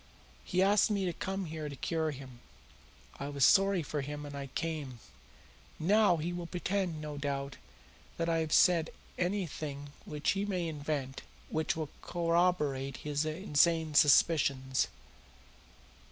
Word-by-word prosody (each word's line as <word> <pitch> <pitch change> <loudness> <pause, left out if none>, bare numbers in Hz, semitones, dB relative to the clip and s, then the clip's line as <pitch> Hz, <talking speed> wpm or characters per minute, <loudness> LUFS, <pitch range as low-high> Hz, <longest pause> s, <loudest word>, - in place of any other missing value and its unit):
He 185 0 +1
asked 205 +2 +4
me 200 -2 0
to 175 - -1
come 190 +2 -3
here 155 -2 -5
to 140 - -7
cure 160 +3 -1
him. 130 -4 -9 0.8
I 140 - -4
was 140 -2 +3
sorry 195 -3 +4
for 150 0 -3
him 145 +2 -6
and 145 - -8
I 140 -1 -5
came. 150 -7 -3 0.8
Now 200 +2 +4
he 165 +3 -3
will 175 -1 -5
pretend, 180 -1 -2
no 150 -1 -6
doubt, 140 -1 -3 0.6
that 165 - -1
I 165 -1 +2
have 160 -1 -2
said 170 -2 +4 0.3
anything 155 -6 -3
which 150 -1 -1
he 195 0 -1
may 185 -4 -1
invent 145 -3 -3 0.3
which 160 0 0
will 155 -2 -4
corroborate 165 -6 0
his 150 0 0
insane 160 -1 +2
suspicions. 140 -3 +4
155 Hz, 140 wpm, -32 LUFS, 145-175 Hz, 0.8 s, asked